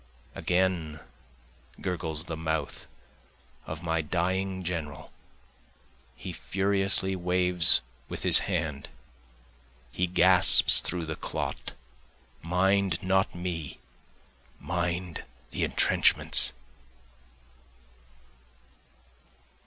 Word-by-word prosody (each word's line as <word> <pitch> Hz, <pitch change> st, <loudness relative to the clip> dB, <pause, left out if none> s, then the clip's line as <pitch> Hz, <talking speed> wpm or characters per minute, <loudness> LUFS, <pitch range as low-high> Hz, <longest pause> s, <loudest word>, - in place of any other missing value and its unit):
Again 90 Hz, -4 st, -2 dB, 0.8 s
gurgles 80 Hz, -4 st, -3 dB
the 85 Hz, -, -6 dB
mouth 80 Hz, -2 st, -4 dB, 0.8 s
of 80 Hz, +1 st, -7 dB
my 80 Hz, -1 st, -1 dB
dying 95 Hz, +4 st, -3 dB
general, 80 Hz, -5 st, -6 dB, 1.0 s
he -, -, -8 dB
furiously 95 Hz, 0 st, 0 dB
waves 90 Hz, -1 st, +5 dB, 0.3 s
with -, -, -5 dB
his -, -, +6 dB
hand, 75 Hz, -2 st, -4 dB, 1.0 s
He 90 Hz, +7 st, -2 dB
gasps 90 Hz, +1 st, +4 dB
through 85 Hz, -1 st, -3 dB
the 80 Hz, 0 st, -5 dB
clot -, -, -6 dB, 0.7 s
Mind 95 Hz, +1 st, 0 dB
not 95 Hz, 0 st, 0 dB
me 85 Hz, -4 st, -6 dB, 0.8 s
mind 90 Hz, 0 st, -4 dB, 0.3 s
the -, -, -3 dB
entrenchments. -, -, +3 dB
90 Hz, 75 wpm, -27 LUFS, 80-95 Hz, 1.0 s, his